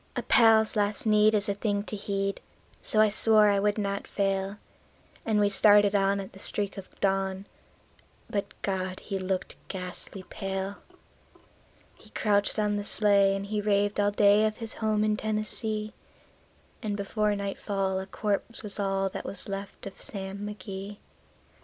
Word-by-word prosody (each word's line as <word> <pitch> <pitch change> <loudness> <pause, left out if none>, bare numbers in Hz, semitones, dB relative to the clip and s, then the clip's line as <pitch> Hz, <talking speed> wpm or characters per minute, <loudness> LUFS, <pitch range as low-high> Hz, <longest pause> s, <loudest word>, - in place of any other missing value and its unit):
A - - -2
pal's 220 -1 +5
last 205 +1 0
need 215 0 +4
is 205 -1 +1
a 200 - +1
thing 205 0 -1
to 210 - -5
heed, 195 -1 -3 0.4
so 215 - 0
I 215 0 +6
swore 215 0 +6
I 200 -1 +2
would 205 +1 +1
not 200 -1 -2
fail; 195 0 -1 0.7
And 215 -2 +2
we 205 - +4
started 205 0 +6
on 200 0 +2
at 195 - -8
the 190 - -13
streak 205 0 -2
of 195 -2 -11
dawn; 195 0 0 0.8
but 200 -1 -3
God! 185 -1 -2
he 195 -2 -4
looked 185 0 -3
ghastly 185 0 -4
pale. 195 0 -4 1.2
He - - -18
crouched 205 -1 +1
on 210 -1 +1
the 205 - -3
sleigh, 200 -2 +3
and 195 0 -4
he 210 +1 -2
raved 205 0 +1
all 205 0 +3
day 205 +1 +4
of 215 - -5
his 225 -1 -2
home 215 -1 0
in 215 0 +1
Tennessee; 215 0 -2 0.9
And 210 -3 -3
before 210 +1 0
nightfall 195 -1 -2
a 190 - -6
corpse 210 +3 -3
was 210 0 -7
all 195 -1 0
that - - -6
was 195 - -5
left 195 0 -7
of 195 -1 -9
Sam 195 -1 -6
McGee. 200 -1 -7
205 Hz, 165 wpm, -28 LUFS, 195-210 Hz, 1.2 s, I